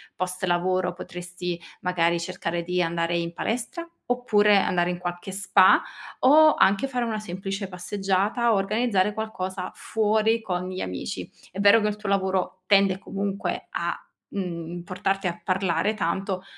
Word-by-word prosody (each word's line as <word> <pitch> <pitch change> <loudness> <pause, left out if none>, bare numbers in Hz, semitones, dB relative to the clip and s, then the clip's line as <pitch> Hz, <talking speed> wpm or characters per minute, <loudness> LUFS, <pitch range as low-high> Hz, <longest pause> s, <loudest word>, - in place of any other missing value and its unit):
post 185 0 -3
lavoro 180 +1 +1
potresti 180 -1 -6 0.2
magari 170 -2 +1
cercare 170 0 -3
di 180 +1 0
andare 170 0 0
in 170 0 -3
palestra, 245 - -3 0.2
oppure 210 -4 +3
andare 180 -2 +2
in 175 - -4
qualche 175 +1 -5
spa, 200 +1 +5 0.4
o 310 +3 +7
anche 200 +7 +3
fare 250 -2 -2
una 220 -2 -2
semplice 195 0 -4
passeggiata 195 +5 0
o - - +3
organizzare 205 0 +1
qualcosa 190 -4 -4
fuori 220 +1 +1
con 180 -3 -3
gli 185 - -5
amici. 90 -1 -4 0.2
È 190 - -7
vero 205 +3 +6
che 210 - +1
il 210 - -4
tuo 210 -1 -7
lavoro 190 -1 0
tende 195 -2 +4
comunque 200 0 -3
a, - - -1 0.4
mhmm, 175 -3 -4
portarti 195 +1 -1
a 175 0 -4
parlare 185 +1 +1
tanto, 190 +1 -2
190 Hz, 150 wpm, -25 LUFS, 180-210 Hz, 0.4 s, o